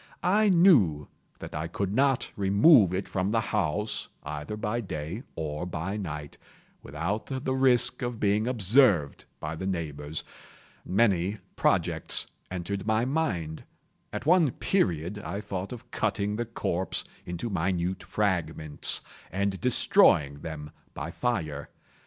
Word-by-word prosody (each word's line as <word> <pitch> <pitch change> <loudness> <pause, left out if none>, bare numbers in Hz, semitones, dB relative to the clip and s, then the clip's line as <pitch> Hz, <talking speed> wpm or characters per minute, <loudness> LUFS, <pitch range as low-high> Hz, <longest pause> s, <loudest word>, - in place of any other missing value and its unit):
I 205 +4 +4
knew 130 - +5 0.3
that - - -9
I 80 +2 -3
could 95 +3 -2
not 135 +1 +2
remove 100 - +6
it 95 +1 -2
from 95 +1 -1
the 115 +1 +2
house, 105 +2 -1
either 75 +7 -5
by 110 +2 -1
day 85 +1 -5
or 80 +2 -3
by 90 +3 -3
night, 75 -7 -6 0.4
without 85 +10 -3
the 130 -1 -2
risk 130 -2 +2
of 120 -2 -3
being 105 +2 +2
observed 105 - +3
by 75 +2 -4
the 95 +4 -4
neighbors. 75 -4 -3 0.6
Many 100 -1 +2 0.2
projects - - +1 0.2
entered 95 +3 -4
my 110 +2 +2
mind. 100 - -1 0.5
At - - -5
one 170 -2 +5
period 90 - 0
I 100 0 -4
thought 95 -2 -5
of 120 -2 -9
cutting 105 0 0
the 120 +2 -2
corpse 95 -5 -2 0.2
into 90 +6 -4
minute 90 0 -1
fragments, 80 -7 0 0.3
and 100 0 -1
destroying 70 - +4
them 75 -2 -7 0.2
by 80 +3 -5
fire. 80 -12 -2
95 Hz, 130 wpm, -28 LUFS, 80-115 Hz, 0.6 s, remove